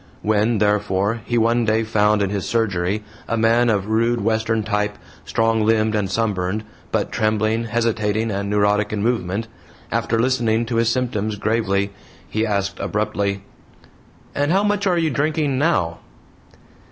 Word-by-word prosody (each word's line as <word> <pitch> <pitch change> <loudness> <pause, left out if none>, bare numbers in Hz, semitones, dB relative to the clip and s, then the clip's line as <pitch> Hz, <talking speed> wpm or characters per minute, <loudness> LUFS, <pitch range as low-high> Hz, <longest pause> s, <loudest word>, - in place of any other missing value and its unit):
When, 110 +2 +2
therefore, 105 +1 +1
he 120 - 0
one 115 +1 +3
day 110 0 +2
found 105 -1 +2
in 100 - -1
his 100 -3 -3
surgery 105 -3 0 0.2
a 115 - -1
man 115 +2 +3
of 100 -3 +1
rude 115 +2 +1
Western 110 +1 0
type, 105 0 -1 0.3
strong 115 -1 +1
limbed 110 0 +2
and 105 -3 0
sunburned, 100 -1 -1 0.3
but - - -1
trembling, 110 +1 0
hesitating 110 -1 0
and 100 0 -2
neurotic 105 0 +2
in 105 -1 -2
movement, 110 -2 -1 0.4
after 115 - 0
listening 115 -2 +1
to 115 0 -2
his 115 0 +3
symptoms 115 -4 -1
gravely, 100 -2 0 0.4
he 110 +1 -1
asked, 100 -1 -1
abruptly: 100 -2 -1 0.9
"And 145 +2 0
how 195 +3 +3
much 205 -1 +1
are 180 -2 +2
you 165 -2 +1
drinking 145 0 0
now?" 115 - +1
110 Hz, 150 wpm, -21 LUFS, 105-115 Hz, 0.9 s, one